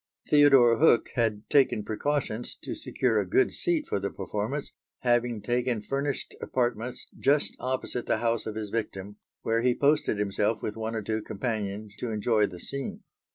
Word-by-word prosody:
Theodore 135 -6 +6
Hook 145 -6 +5
had 110 -3 0
taken 135 -6 +3
precautions 120 +1 -2
to - - -4
secure 115 -4 0
a 95 -3 -2
good 130 - +3
seat 330 -4 0
for - - -1
the 100 +1 -2
performance, 110 +8 -4 0.3
having 120 -3 +1
taken 120 -2 0
furnished 140 +3 -2
apartments 120 -1 -1
just 145 +1 +2
opposite 130 -1 -3
the - - +2
house 115 -1 0
of 110 - -4
his 105 -2 -4
victim, 105 -3 -4 0.3
where 115 +1 +1
he 125 0 +2
posted 145 -6 +2
himself 105 +2 0
with 105 - -3
one 110 0 -3
or 110 - -2
two 110 +1 -1
companions 105 -1 -4
to 125 - -3
enjoy 110 0 +2
the 90 -2 -10
scene. 140 +6 -6
115 Hz, 165 wpm, -28 LUFS, 105-130 Hz, 0.3 s, Theodore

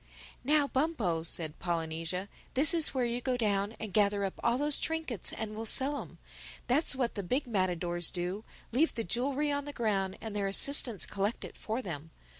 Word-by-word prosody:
"Now, 290 +2 +3
Bumpo," 260 - 0
said 160 -1 -3
Polynesia, 165 +2 -3 0.3
"this 290 +6 +6
is 330 -3 +4
where 255 -2 0
you 240 +1 -2
go 255 0 -1
down 205 -1 0
and 215 -4 -6
gather 205 -1 +2
up 190 - -3
all 235 +1 +2
those 290 +1 +2
trinkets 320 - -2
and 215 -1 -5
we'll 225 +1 -5
sell 280 +5 +4
'em. - - -12 0.5
That's 270 +3 +2
what 250 -3 -1
the 205 - -4
big 255 +10 -1
matadors 175 -5 0
do: 180 +3 -4 0.3
leave 290 +8 +2
the 230 - -2
jewelry 275 +9 -1
on 285 0 -2
the 290 - -7
ground 195 -6 -1
and 220 -2 -7
their 200 -1 -1
assistants 235 +1 +6
collect 205 +3 -3
it - - -11
for 225 +4 -4
them. 160 -4 -6
220 Hz, 190 wpm, -31 LUFS, 190-265 Hz, 0.5 s, this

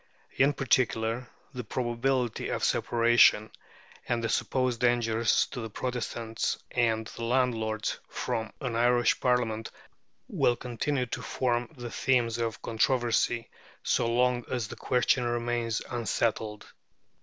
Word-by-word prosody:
In 140 +2 +4
particular, 120 -3 0 0.2
the 125 -1 -5
probability 120 +1 -1
of - - -2
separation, 115 -2 +4 0.6
and 120 -1 0
the 115 - 0
supposed 130 0 0
dangers 115 -2 +2
to 125 - -5
the 115 - -5
Protestants 115 -1 -3
and 115 -2 +1
the 115 - -8
landlords 115 -3 0
from 115 -3 -3
an 125 -4 -2
Irish 120 +1 +3
Parliament, 115 -3 0 0.6
will 120 - +2
continue 125 +3 -2
to 115 - -5
form 120 -2 -1
the 120 -1 -6
themes 120 -4 +1
of 115 -1 -3
controversy 120 0 +1 0.3
so - - +1
long 125 0 +2
as 120 -4 -2
the - - -7
question 125 0 +1
remains 120 -1 -1
unsettled. 110 -2 -2
120 Hz, 120 wpm, -28 LUFS, 115-125 Hz, 0.6 s, In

